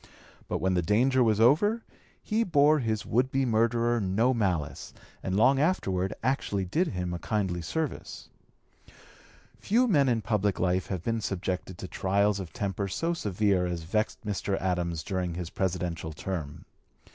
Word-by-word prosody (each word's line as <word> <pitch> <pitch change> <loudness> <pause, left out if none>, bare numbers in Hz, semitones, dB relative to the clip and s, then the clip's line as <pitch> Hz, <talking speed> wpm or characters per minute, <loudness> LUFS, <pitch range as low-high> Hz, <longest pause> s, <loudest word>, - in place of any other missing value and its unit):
But - - -1
when 95 0 0
the 90 - +2
danger 125 +8 +3
was 110 -2 +2
over 205 - +4 0.4
he 220 +2 +1
bore 150 -5 +4
his 110 -4 -2
would 125 +4 +1
be 135 0 +1
murderer 115 0 +2
no 105 +7 +2
malice, 90 - -2 0.3
and 95 - -2
long 130 +6 +4
afterward 95 - +1
actually 115 -7 0
did 165 - +1
him 90 - -3
a 85 - -4
kindly 95 -5 -1
service. 150 - -4 1.3
Few 240 +5 +2
men 145 - +3
in 115 -3 0
public 105 -2 0
life 90 +1 +1
have 95 -4 -4
been 115 +1 -1
subjected 95 -2 -3
to 95 - -6
trials 100 +2 +1
of 90 -4 -6
temper 100 -3 -2
so 165 - -1
severe 100 - +1
as 85 -2 -4
vexed 105 +6 -2
Mr. 100 -1 -1
Adams 85 -3 -1
during 90 -2 -2
his 90 -1 -5
Presidential 90 -4 -2
term. 75 -3 -5
100 Hz, 160 wpm, -28 LUFS, 90-125 Hz, 1.3 s, over